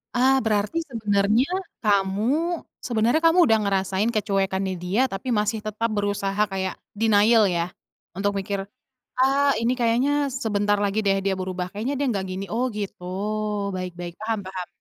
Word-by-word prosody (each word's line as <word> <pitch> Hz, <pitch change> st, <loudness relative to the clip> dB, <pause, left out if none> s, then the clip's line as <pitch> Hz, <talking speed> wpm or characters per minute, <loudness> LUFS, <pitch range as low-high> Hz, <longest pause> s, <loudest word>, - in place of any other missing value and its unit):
Ah, 260 Hz, +2 st, +4 dB
berarti 215 Hz, +7 st, 0 dB
sebenarnya 210 Hz, +2 st, +2 dB, 0.3 s
kamu 200 Hz, -2 st, +2 dB, 0.7 s
sebenarnya 235 Hz, +6 st, +2 dB
kamu, 330 Hz, +2 st, +5 dB
udah 220 Hz, -, +5 dB
ngerasain 195 Hz, +2 st, 0 dB
kecuekannya 195 Hz, -2 st, 0 dB
dia, 195 Hz, +8 st, +1 dB
tapi 195 Hz, +6 st, -6 dB
masih 215 Hz, +2 st, 0 dB
tetap 215 Hz, +2 st, -1 dB
berusaha 205 Hz, -1 st, -1 dB, 0.2 s
kayak 190 Hz, -1 st, -2 dB, 0.2 s
denial 220 Hz, +1 st, +5 dB
ya 170 Hz, -1 st, 0 dB, 0.5 s
untuk 205 Hz, +1 st, +1 dB
mikir, 195 Hz, 0 st, -3 dB, 0.6 s
"Ah 275 Hz, +1 st, +4 dB
ini 235 Hz, -, +2 dB
kayaknya 235 Hz, +4 st, +2 dB, 0.3 s
sebentar 205 Hz, -2 st, +1 dB
lagi 200 Hz, +1 st, 0 dB
deh 195 Hz, -, +4 dB
dia 195 Hz, 0 st, +1 dB
berubah 185 Hz, -1 st, -3 dB
kayaknya 225 Hz, +8 st, -3 dB
dia 285 Hz, -, 0 dB
enggak 195 Hz, -4 st, -2 dB
gini". 190 Hz, +1 st, -4 dB
Oh 240 Hz, +3 st, +1 dB
gitu, 200 Hz, -3 st, -5 dB, 0.7 s
baik 185 Hz, -1 st, -4 dB
baik 175 Hz, -1 st, -6 dB
paham 220 Hz, 0 st, -1 dB
paham. 185 Hz, -1 st, -5 dB
205 Hz, 150 wpm, -24 LUFS, 195-230 Hz, 0.7 s, kamu